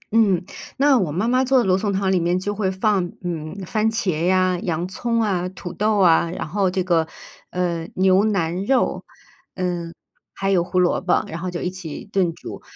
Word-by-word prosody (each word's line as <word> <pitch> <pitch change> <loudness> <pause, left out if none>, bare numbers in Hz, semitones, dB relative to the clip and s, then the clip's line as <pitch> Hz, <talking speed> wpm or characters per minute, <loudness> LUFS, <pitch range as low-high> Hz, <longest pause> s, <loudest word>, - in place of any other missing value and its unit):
嗯。 190 -6 +3 0.3
那 275 -1 +5
我 170 -6 -1
妈 185 +9 -1
妈 255 +2 +3
做 265 0 +3
的 245 - +4
罗 185 -1 +3
宋 205 0 -1
汤 190 0 0
里 185 - +3
面 175 +2 +1
就 205 +2 -2
会 200 -2 -1
放， 190 0 +1 0.2
嗯， 165 -1 -4
番 215 +4 +1
茄 180 -7 -1
呀、 185 -1 +3
洋 170 +1 -2
葱 230 +4 -1
啊、 185 -4 0
土 180 -2 -8
豆 210 0 +1
啊， 170 -2 +4
然 170 - -5
后 195 +2 +1
这 185 0 -1
个， 165 -3 +2 0.4
呃， 170 -2 -2
牛 190 +1 +4
腩 185 -3 0
肉， 265 +1 +1 0.5
嗯， 175 -2 -3 0.4
还 195 0 -1
有 175 -3 +3
胡 180 +1 -4
萝 180 - +2
卜， 180 -1 +1
然 165 - -6
后 185 +1 -3
就 175 - -5
一 180 - -1
起 175 -4 -7
炖 190 -4 0
煮。 - - -9
185 Hz, 215 characters per minute, -22 LUFS, 175-205 Hz, 0.5 s, 那